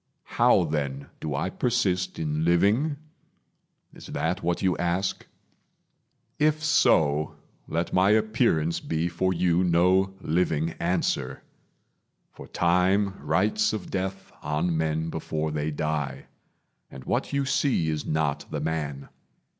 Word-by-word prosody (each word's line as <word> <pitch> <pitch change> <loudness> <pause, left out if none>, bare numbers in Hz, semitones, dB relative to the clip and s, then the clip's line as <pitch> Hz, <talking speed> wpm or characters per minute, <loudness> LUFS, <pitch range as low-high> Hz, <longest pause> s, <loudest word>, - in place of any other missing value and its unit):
How - - +6
then 70 -2 -3
do 75 -3 -3
I 80 +7 -2
Persist 100 -7 0
in 75 0 -1
living? 100 - +2 1.0
Is - - -12
that 90 +3 -2
what 85 +2 -1
you 95 -2 +2
ask? 90 +3 -1 1.1
If 155 +1 +2
so, 75 - +3 0.3
let 85 +1 -2
my 95 +2 +4
appearance 110 -7 +2
be 80 +1 -2
for 90 +2 0
you 90 0 +2
No 90 +2 +3
living 80 -2 0
answer; 65 +1 -1 0.9
for - - -12
Time 95 +3 +2
writes 100 +9 +1
of 105 -4 -5
death 95 0 -4
On 75 +3 -1
men 80 0 -1
before 80 -1 -3
they 75 0 -2
die, 75 -2 -3 0.6
and 65 - -10
what 120 - -1
you 140 -1 0
see 135 - +1
Is 75 -1 -1
not 75 -2 -1
the - - -3
man. 75 -4 -3
85 Hz, 125 wpm, -26 LUFS, 75-95 Hz, 1.1 s, How